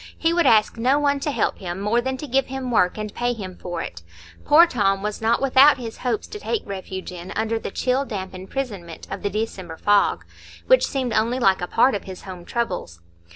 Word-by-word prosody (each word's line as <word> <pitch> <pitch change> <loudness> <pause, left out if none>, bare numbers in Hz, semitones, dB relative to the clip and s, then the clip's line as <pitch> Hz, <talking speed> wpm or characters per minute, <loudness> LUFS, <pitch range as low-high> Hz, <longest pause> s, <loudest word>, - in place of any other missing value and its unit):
He 330 +1 +1
would 345 0 +3
ask 215 +1 +4
no 255 +5 +3
one 285 -1 +1
to 285 - -2
help 285 - -1
him, 175 -1 -5
more 210 +4 +1
than 260 +1 -3
to 300 - -6
give 270 0 +1
him 265 -1 -4
work 180 -5 +2
and 215 -1 -5
pay 245 0 0
him 190 -5 -7
for 175 -2 -5
it. 85 - -8 0.4
Poor 320 +4 +7
Tom 195 - 0
was 210 +1 -3
not 225 +1 +2
without 275 +2 +6
his 230 -3 -7
hopes 245 -4 -1
to 420 - -7
take 440 +1 -2
refuge 190 -1 -6
in 180 0 -8
under 225 +1 0
the - - -5
chill 255 +6 0
damp 195 -8 -6
imprisonment 190 -3 -6
of - - -5
the 205 - -1
December 190 -5 -4
fog, 205 +2 +2 0.4
which - - +5
seemed 260 -4 -2
only 225 +4 +1
like 195 -7 +3
a 180 - -2
part 250 +7 +3
of 200 - -4
his 190 -1 -9
home 180 -2 -9
troubles. 180 - -3
225 Hz, 220 wpm, -23 LUFS, 190-260 Hz, 0.4 s, Poor